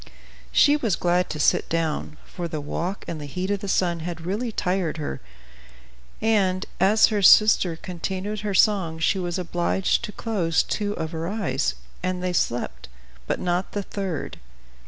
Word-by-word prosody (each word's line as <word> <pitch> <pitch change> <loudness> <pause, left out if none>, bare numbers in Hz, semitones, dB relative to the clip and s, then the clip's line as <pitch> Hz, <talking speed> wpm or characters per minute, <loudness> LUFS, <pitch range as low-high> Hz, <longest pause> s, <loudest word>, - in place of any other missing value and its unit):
She 290 0 +5
was 225 -10 0
glad 180 +1 +1
to 155 - -4
sit - - +2
down, 160 -2 -2
for 175 -2 -5
the 155 -2 -4
walk 170 +6 -4
and 160 -3 -5
the 145 - -6
heat 185 +7 -3
of 200 - 0
the 200 - -6
sun 175 -3 +1
had 170 0 -5
really 220 +6 -2
tired 180 -5 -1
her; 145 - -4 1.0
and, 200 -4 +2
as 205 +4 +6
her 205 - +1
sister 195 -3 +6
continued 190 +5 -4
her 205 -1 -2
song, 185 -6 +3
she 160 +4 +1
was 175 -1 -2
obliged 180 +3 0
to 210 - -7
close 195 -7 0
two 205 -1 -2
of 160 -5 -4
her 165 0 -3
eyes, 190 - -1 0.3
and 185 0 -2
they 180 -1 -1
slept, - - -2 0.4
but - - -1
not 180 +1 -1
the 205 - -2
third. 190 -5 -4
180 Hz, 170 wpm, -24 LUFS, 165-200 Hz, 1.0 s, as